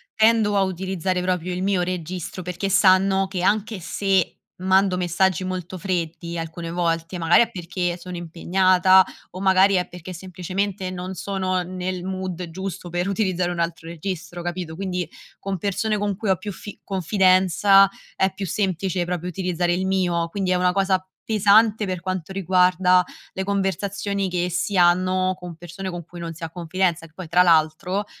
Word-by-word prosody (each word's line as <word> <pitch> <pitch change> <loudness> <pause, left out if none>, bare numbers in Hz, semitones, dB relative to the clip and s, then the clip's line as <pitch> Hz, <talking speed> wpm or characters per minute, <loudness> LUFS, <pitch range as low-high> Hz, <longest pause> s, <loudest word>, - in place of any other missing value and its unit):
tendo 220 -2 +4
a - - +4
utilizzare 185 -1 -2
proprio 180 -1 -1
il 180 +1 -3
mio 195 -2 +1
registro 180 0 -4
perché 180 +2 -3
sanno 195 0 +4
che, 190 -2 -4
anche 210 +2 +1
se 190 0 0 0.3
mando 190 0 +3
messaggi 180 +1 +1
molto 185 0 -5
freddi 170 -1 -3
alcune 165 +1 -5
volte, 165 0 -1
magari 165 +3 +5
è 235 - +2
perché 180 -3 -3
sono 180 +1 -8
impegnata 185 +2 +4 0.3
o 185 - -8
magari 190 +1 +5
è 180 -2 +1
perché 180 +1 -9
semplicemente 185 +2 -3
non 185 +1 -5
sono 185 0 -1
nel 185 0 -4
mood 185 -2 -4
giusto 190 0 -6
per 175 +2 -1
utilizzare 185 -3 0
un 175 - -4
altro 165 -1 -2
registro, 175 +1 -5
capito? 175 -2 -4
Quindi 180 -2 -3 0.3
con 195 -1 -3
persone 210 +4 -1
con 205 -1 -1
cui 210 +2 -3
ho 190 - +4
più 205 - -6
fi 205 +2 -10
confidenza 190 +1 +4 0.3
è 190 0 +2
più 195 +1 -5
semplice 190 -1 -1
proprio 180 0 -3
utilizzare 180 -1 -1
il 185 +2 -1
mio, 175 -3 +1
quindi 190 +1 -2
è - - +3
una 180 0 +2
cosa 190 -1 +1 0.2
pesante 215 0 +4
per 185 -2 -3
quanto 185 -1 -4
riguarda 180 -1 +3 0.3
le 190 - -3
conversazioni 200 0 -1
che 180 0 -1
si 185 +3 -1
hanno 185 +1 +3
con 175 -2 -8
persone 175 +3 -7
con 175 -1 -6
cui 175 +1 -11
non 165 -1 -5
si 165 +1 -11
ha 165 - -3
confidenza, 175 0 -1
che 155 - -27
poi 185 -1 -7
tra 175 +3 +4
l'altro, 175 +4 +2
185 Hz, 170 wpm, -23 LUFS, 175-195 Hz, 0.3 s, magari